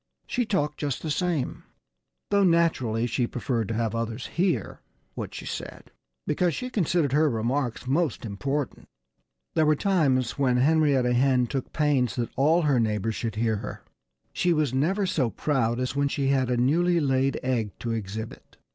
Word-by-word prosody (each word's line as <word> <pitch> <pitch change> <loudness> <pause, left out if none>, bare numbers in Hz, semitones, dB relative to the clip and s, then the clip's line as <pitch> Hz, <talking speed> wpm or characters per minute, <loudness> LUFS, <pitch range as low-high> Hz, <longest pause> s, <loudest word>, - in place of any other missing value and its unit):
She 245 -3 -1
talked 150 -8 -1
just 145 -4 -3
the 155 - -2
same 170 -5 -1 0.7
though 200 0 +4
naturally 160 - +2
she 120 0 0
preferred 115 -3 -2
to 115 - -3
have 115 -1 -1
others 115 +1 -3
hear 180 0 -1 0.3
what - - -6
she - - -7
said, - - -7 0.3
because 170 +2 +1
she 250 0 -5
considered 170 - +1
her 150 +2 +3
remarks 120 +2 -1
most 140 -2 0
important. 125 +7 -3 0.7
There 155 -1 +3
were 155 - +4
times 140 - +1
when 130 -3 +3
Henrietta 140 -3 +3
Hen 125 0 +3
took 135 +1 -4
pains 140 -7 +1
that 120 -2 -2
all 155 +6 +3
her 140 -5 +3
neighbors 110 -1 0
should 110 -1 -4
hear 110 -1 +1
her. - - -7 0.5
She 175 -1 +2
was 150 -5 0
never 180 +10 +1
so 135 -9 +1
proud 120 -3 0
as 125 +1 -2
when 140 0 +2
she 140 -1 -1
had 130 -2 +2
a 125 - +1
newly 170 +8 +3
laid 135 -2 +1
egg 120 -5 0
to 120 - -2
exhibit. 110 0 -6
135 Hz, 170 wpm, -26 LUFS, 120-155 Hz, 0.7 s, though